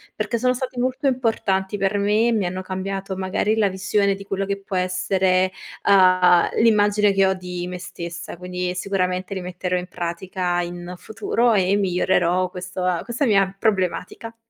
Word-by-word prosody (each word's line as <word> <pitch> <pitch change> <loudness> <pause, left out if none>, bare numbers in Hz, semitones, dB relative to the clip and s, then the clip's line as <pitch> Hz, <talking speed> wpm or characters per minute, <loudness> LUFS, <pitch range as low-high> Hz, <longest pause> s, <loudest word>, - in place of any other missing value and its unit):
perché 215 +2 -2
sono 250 +2 +2
stati 250 0 -5
molto 255 +3 0
importanti 215 -6 0
per 195 +1 +1
me 210 +3 +2
e - - +2
mi 215 -4 +1
hanno 185 +1 -3
cambiato 190 +1 -4
magari 190 +3 0
la 215 -3 +2
visione 195 +1 +1
di 195 +1 -8
quello 195 0 -2
che 200 0 -3
può 195 -1 -6
essere, 185 0 +1 0.4
uhm, 185 -3 +5
l'immagine 210 -2 +4
che 195 0 +3
ho 190 - +3
di 180 -1 -6
me 180 0 -6
stessa, 175 -1 -7
quindi 180 0 -4
sicuramente 185 0 -2
li 190 - -4
metterò 180 0 -3
in 180 0 -4
pratica 175 +1 -2
in 175 0 -6
futuro 230 +3 0
e 190 -2 +2
migliorerò 180 -1 +1
questo 180 0 -5
ehm, 180 -2 0
questa 245 +4 -1
mia 195 -4 +2
problematica. 200 +2 -1
190 Hz, 170 wpm, -22 LUFS, 180-205 Hz, 0.4 s, uhm